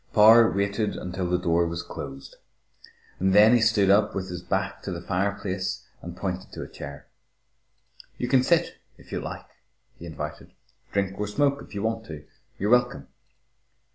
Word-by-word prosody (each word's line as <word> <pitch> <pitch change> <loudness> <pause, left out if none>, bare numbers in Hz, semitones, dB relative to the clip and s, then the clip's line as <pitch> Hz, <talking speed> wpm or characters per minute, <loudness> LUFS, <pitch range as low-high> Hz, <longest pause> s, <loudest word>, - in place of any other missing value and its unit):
Power 110 +1 +8
waited 100 +2 -1
until 90 0 -4
the 90 - +2
door 85 -1 +1
was 85 0 -4
closed. 70 -3 -9 0.8
Then 105 +4 +6
he 120 - +4
stood 105 -3 +4
up 105 +1 +3
with 95 -1 -3
his 90 -1 -5
back 95 +2 -2
to 95 - -5
the 85 - -4
fireplace 100 +1 -2 0.2
and 85 0 -8
pointed 95 -1 -4
to - - -6
a - - -8
chair. 70 +1 -9 1.1
"You 125 - -2
can 130 0 +4
sit, 170 +5 +1 0.2
if - - -18
you - - -2
like," - - -7 0.5
he 85 - -8
invited. 80 - -7 0.4
"Drink 100 -1 -1
or 105 - -1
smoke 140 +6 +1
if - - -12
you 100 - -3
want 110 0 -2
to. 75 -2 -9 0.3
You're 105 +3 -1
welcome." 125 - +2
100 Hz, 170 wpm, -26 LUFS, 90-110 Hz, 1.1 s, Power